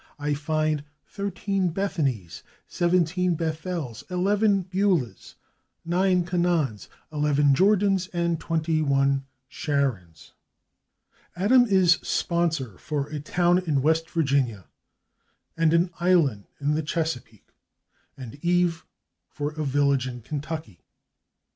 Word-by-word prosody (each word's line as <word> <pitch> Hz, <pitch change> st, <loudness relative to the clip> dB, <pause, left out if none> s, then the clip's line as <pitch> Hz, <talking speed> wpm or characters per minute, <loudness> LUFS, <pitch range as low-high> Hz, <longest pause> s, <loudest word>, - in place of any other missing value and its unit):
I 145 Hz, 0 st, -1 dB
find 155 Hz, 0 st, -1 dB, 0.2 s
thirteen 195 Hz, -2 st, -2 dB
/Bethanys/, 140 Hz, -, -2 dB, 0.3 s
seventeen 175 Hz, 0 st, +1 dB
/Bethels/, 160 Hz, -6 st, -4 dB
eleven 200 Hz, +2 st, +2 dB
/Beulahs/, 185 Hz, -, -1 dB, 0.5 s
nine 180 Hz, +1 st, +2 dB
/Canaans/, 170 Hz, -, 0 dB, 0.3 s
eleven 145 Hz, -1 st, +3 dB
/Jordans/ 195 Hz, +2 st, +3 dB
and 170 Hz, -2 st, -1 dB
twenty 160 Hz, -1 st, 0 dB
one 140 Hz, -1 st, +1 dB, 0.2 s
/Sharons/. 115 Hz, -, -3 dB, 1.1 s
/Adam/ 245 Hz, +7 st, +5 dB
is 185 Hz, -5 st, +4 dB
sponsor 165 Hz, -, -1 dB
for 145 Hz, -2 st, -3 dB
a 150 Hz, -, -4 dB
town 175 Hz, +4 st, +2 dB
in 150 Hz, -7 st, 0 dB
West 160 Hz, +2 st, +1 dB
Virginia 135 Hz, -, 0 dB, 0.9 s
and 165 Hz, -1 st, +2 dB
an 170 Hz, +2 st, +2 dB
island 165 Hz, -, +2 dB
in 145 Hz, +1 st, 0 dB
the 155 Hz, -, 0 dB
Chesapeake, 150 Hz, -, -4 dB, 0.7 s
and 130 Hz, +2 st, -10 dB
/Eve/ 175 Hz, -1 st, +1 dB, 0.5 s
for 145 Hz, 0 st, -4 dB
a 155 Hz, 0 st, -4 dB
village 140 Hz, -2 st, +1 dB
in 125 Hz, -2 st, -7 dB
Kentucky. 150 Hz, -, -6 dB
160 Hz, 105 wpm, -25 LUFS, 140-180 Hz, 1.1 s, Adam